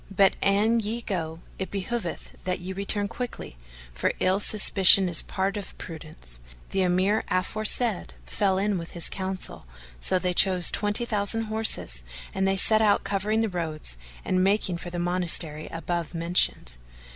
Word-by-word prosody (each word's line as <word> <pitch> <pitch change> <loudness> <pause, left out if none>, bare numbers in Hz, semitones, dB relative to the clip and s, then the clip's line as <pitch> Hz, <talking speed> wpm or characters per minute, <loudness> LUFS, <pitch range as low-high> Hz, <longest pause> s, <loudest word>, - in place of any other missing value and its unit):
But, 195 -1 +3
an 210 +4 +2
ye 225 +2 -3
go, 165 -4 -4 0.2
it 190 - -4
behoveth 200 -1 -4
that 180 -1 -2
ye 185 +1 -6
return 200 +1 0
quickly, 245 - -7 0.4
for 60 - -1
ill 185 +2 +2
suspicion 195 -2 +5
is 170 -3 +4
part 195 +1 -3
of 200 - -8
prudence." 155 - -9 0.3
The 190 - 0
Emir 185 +4 +1
aforesaid 215 +3 -1
fell 195 -2 0
in 200 -1 0
with 170 - -9
his 170 - -4
counsel; 190 - -5 0.3
so 185 - +3
they 180 0 -1
chose 180 -1 +5
twenty 210 +3 0
thousand 220 0 -1
horse 220 - 0 0.3
and 190 0 0
they 195 0 +1
set 215 +3 +6
out 205 -2 +3
covering 205 +3 0
the 225 - +1
roads 160 - -4 0.3
and 185 0 +1
making 195 -2 +1
for 175 - -8
the 175 - -6
monastery 175 -3 +1
above 170 0 -4
mentioned. 165 - 0
190 Hz, 155 wpm, -25 LUFS, 175-205 Hz, 0.4 s, set